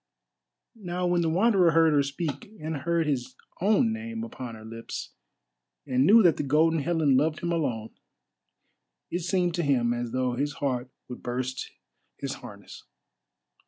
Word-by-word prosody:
Now 180 -1 -2
when 175 -1 +2
the 165 - +1
Wanderer 185 -1 +4
heard 165 -1 +5
her 145 - +4
speak, 145 +6 -4
and 155 +1 -4
heard 170 +3 0
his 135 -5 -2 0.3
own 220 +4 +3
name 230 0 -5
upon 130 - -7
her 110 0 -12
lips, 115 +1 -7 0.7
and 130 0 +2
knew 225 +2 +8
that 170 -4 +5
the - - 0
Golden 155 +4 +3
Helen 155 -3 +2
loved 155 +3 +1
him 170 - -1
alone, 125 -10 -1 1.2
it 175 - -1
seemed 180 0 +1
to 175 - 0
him 125 -6 +2
as 120 0 -3
though 130 0 0
his 145 +4 -1
heart 130 -3 -2 0.2
would 125 - -8
burst 130 +1 -3 0.5
his 140 -1 -4
harness. 100 -5 -11
150 Hz, 160 wpm, -27 LUFS, 130-175 Hz, 1.2 s, knew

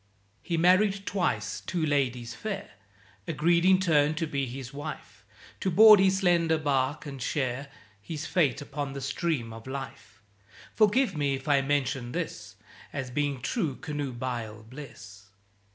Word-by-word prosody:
He 170 - -2
married 195 +3 +3
twice; 110 - -1
two 170 -3 -1
ladies 125 -5 0
fair 205 -2 -5 0.6
Agreed 170 +2 +2
in 190 0 +6
turn 155 -4 +3
to 165 +1 -1
be 140 -3 -2
his 130 +1 -7
wife, 145 +2 -8 0.4
To 190 - 0
board 215 +3 +9
his 190 0 +4
slender 170 -4 +3
barque 145 -1 0
and 135 -3 -7
share 130 0 -2 0.3
His 160 +4 -6
fate 145 -7 +1
upon 140 -1 -5
the 140 - -5
stream 135 -3 -2
of 115 +2 -11
Life. 130 -5 -8 0.5
(Forgive 220 -1 +3
me 140 -2 +1
if 135 +2 -9
I 140 -2 +4
mention 135 -3 -1
this - - -5 0.4
As 135 -3 -5
being 140 -1 -1
true 155 - -1
Canoebial 120 -7 -5
bliss!) 110 -7 -11
145 Hz, 145 wpm, -28 LUFS, 130-170 Hz, 0.6 s, board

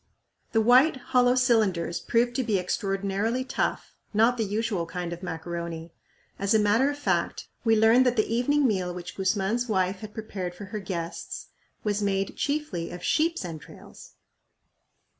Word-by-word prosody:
The 225 - +3
white 255 +7 +6 0.2
hollow 250 0 +5
cylinders 215 -10 +2
proved 240 +1 +1
to 260 - +1
be 220 -4 +1
extraordinarily 195 +5 -1
tough, 255 - -2 0.2
not 225 +3 +4
the 230 - -1
usual 210 -4 -1
kind 175 0 -4
of 175 - -8
macaroni. 170 -1 -5 0.5
As 200 +2 +2
a - - +5
matter 220 +6 +3
of 290 - -4
fact, 290 - -1
we 225 -2 +4
learned 230 +4 +5
that 245 - +2
the 215 - +2
evening 270 +5 +2
meal 185 -5 -1
which 180 - -7
Guzman's 200 +5 0
wife 190 -2 +1
had 210 0 -9
prepared 190 -5 -5
for 205 - -8
her 210 +3 -5
guests 175 -4 -5 0.3
was 210 -1 0
made 195 -1 -1
chiefly 280 - -2
of 175 0 -8
sheep's 325 - +1
entrails! 160 -3 -11
210 Hz, 160 wpm, -27 LUFS, 180-240 Hz, 0.5 s, white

